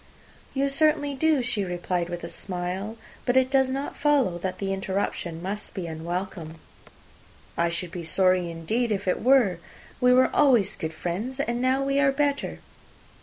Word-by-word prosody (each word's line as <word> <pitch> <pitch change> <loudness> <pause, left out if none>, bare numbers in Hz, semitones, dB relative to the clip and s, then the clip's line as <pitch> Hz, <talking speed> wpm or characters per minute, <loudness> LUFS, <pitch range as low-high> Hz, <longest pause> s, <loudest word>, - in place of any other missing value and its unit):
"You 275 +1 +2
certainly 290 0 +2
do," 295 -1 +2
she 225 -4 -1
replied 175 -1 -2
with 175 -1 -5
a - - -4
smile; 185 +5 -4 0.3
"but 245 0 +2
it 260 0 +3
does 265 -1 +3
not 275 +2 -3
follow 280 - +2
that 185 +1 -3
the 195 -1 -2
interruption 190 -3 -3
must 205 +3 -4
be 185 -3 -3
unwelcome." 165 0 -5 1.0
"I 170 0 +1
should 170 0 -4
be 175 -2 -6
sorry, 185 +2 +2
indeed, 215 +9 -1
if 200 -1 -2
it 180 - +1
were. 240 -9 +4 0.4
We 250 -1 +5
were 255 +1 +4
always 245 -9 +4
good 160 - -4
friends, 210 - -4
and 240 -3 -1
now 260 +1 +2
we 275 0 +1
are 280 -1 +4
better." 285 0 -1
200 Hz, 170 wpm, -26 LUFS, 175-265 Hz, 1.0 s, We